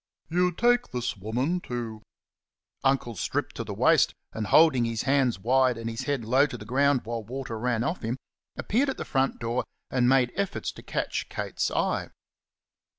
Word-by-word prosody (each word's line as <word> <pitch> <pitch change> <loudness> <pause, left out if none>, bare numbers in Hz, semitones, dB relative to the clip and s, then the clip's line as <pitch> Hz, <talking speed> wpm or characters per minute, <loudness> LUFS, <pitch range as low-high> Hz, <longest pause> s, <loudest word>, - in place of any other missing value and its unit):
"You 180 +1 +3
take 245 +6 +2
this 125 -1 -3
woman 125 - -1
to 115 -3 -4 0.4
" - - -44
Uncle, 125 -3 -2
stripped 95 - -2
to - - -2
the - - -7
waist, - - +4 0.2
and 110 -2 -3
holding 155 -6 +6
his 115 -1 -1
hands 135 -4 +2
wide 125 +4 +2
and 115 0 -5
his 115 0 -4
head 140 -6 -1
low 130 +6 +4
to 125 - -7
the 105 - -10
ground, 135 +3 +3
while 115 0 -3
water 120 0 -5
ran 120 -1 0
off 170 - -2
him, 115 +3 -2 0.4
appeared 265 +7 +1
at 270 - -3
the - - -4
front 135 -1 +1
door 120 +2 -1 0.3
and 125 -1 +3
made 130 -2 +4
efforts 200 0 -2
to - - -12
catch - - -3
Kate's - - -2
eye. - - -1
125 Hz, 185 wpm, -27 LUFS, 115-140 Hz, 0.4 s, holding